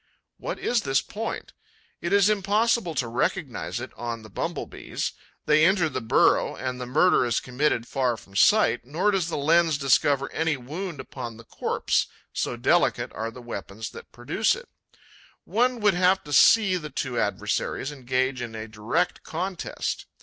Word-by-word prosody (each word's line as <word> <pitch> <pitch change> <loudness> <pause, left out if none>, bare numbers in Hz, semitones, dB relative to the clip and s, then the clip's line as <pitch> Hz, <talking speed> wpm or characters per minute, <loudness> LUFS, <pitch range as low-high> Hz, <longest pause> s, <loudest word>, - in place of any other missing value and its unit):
What - - -4
is 240 -2 +1
this 135 -5 +2
point? 225 +2 -5 0.5
It 170 - -2
is 200 -1 +5
impossible 210 -2 +1
to 125 - 0
recognize 125 - -2
it 130 - -7
on 115 -2 -5
the 110 - -13
Bumble - - -3
bees. - - -4 0.3
They 155 +1 +4
enter 180 -2 +4
the 130 -3 -3
burrow; 110 - +3
and 130 -1 -4
the 125 - -4
murder 180 +7 +4
is 120 -3 +1
committed 125 -2 0
far 125 -4 0
from 100 -2 -17
sight. 205 - +4
Nor 160 +11 +1
does 190 -4 0
the 170 - -3
lens 160 +1 +3
discover 140 0 +2
any 160 -2 0
wound 155 +5 -6
upon 120 -4 -7
the 115 - -12
corpse, - - -1 0.3
so - - -2
delicate - - +2
are 110 +1 -3
the 120 +2 -11
weapons 110 -2 -6
that - - -12
produce 145 - 0
it. 485 0 -11 0.7
One 245 +2 +1
would 205 -1 +4
have 185 +2 +3
to 145 - -7
see 195 +2 +6
the 155 -3 -6
two 130 -3 -3
adversaries 105 +7 -1
engage 130 -1 -1
in 115 -2 -6
a 110 0 -6
direct 115 +12 -1
contest. 180 +2 -4
145 Hz, 170 wpm, -25 LUFS, 120-185 Hz, 0.7 s, see